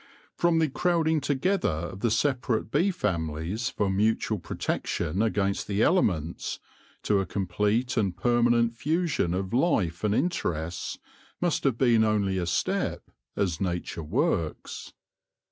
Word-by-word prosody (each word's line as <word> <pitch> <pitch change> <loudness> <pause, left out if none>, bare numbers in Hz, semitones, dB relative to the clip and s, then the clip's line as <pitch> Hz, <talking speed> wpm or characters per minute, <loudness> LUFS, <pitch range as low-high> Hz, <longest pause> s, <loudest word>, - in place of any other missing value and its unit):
From 170 -1 +2
the 160 -1 +3
crowding 160 +1 +1
together 145 +8 +1
of 85 +4 -4
the 115 - +1
separate 120 -2 0
bee 170 +8 +3
families 90 - -2
for 105 -5 -1
mutual 105 +2 +1
protection 85 +1 -2
against 100 -3 0
the 100 +1 +1
elements, 90 - +1 0.5
to 100 -2 +2
a 95 - -2
complete 105 +7 0
and 95 -5 0
permanent 120 +1 +3
fusion 150 - 0
of 95 +2 -3
life 105 - +1
and 105 0 +2
interests, 85 - -2 0.4
must 175 -4 0
have 130 -4 +2
been 120 -4 +4
only 100 -3 +1
a 85 - -2
step, 85 - -1 0.2
as 90 -6 -1
Nature 90 -2 -2
works. 85 - -2
110 Hz, 130 wpm, -27 LUFS, 90-130 Hz, 0.5 s, been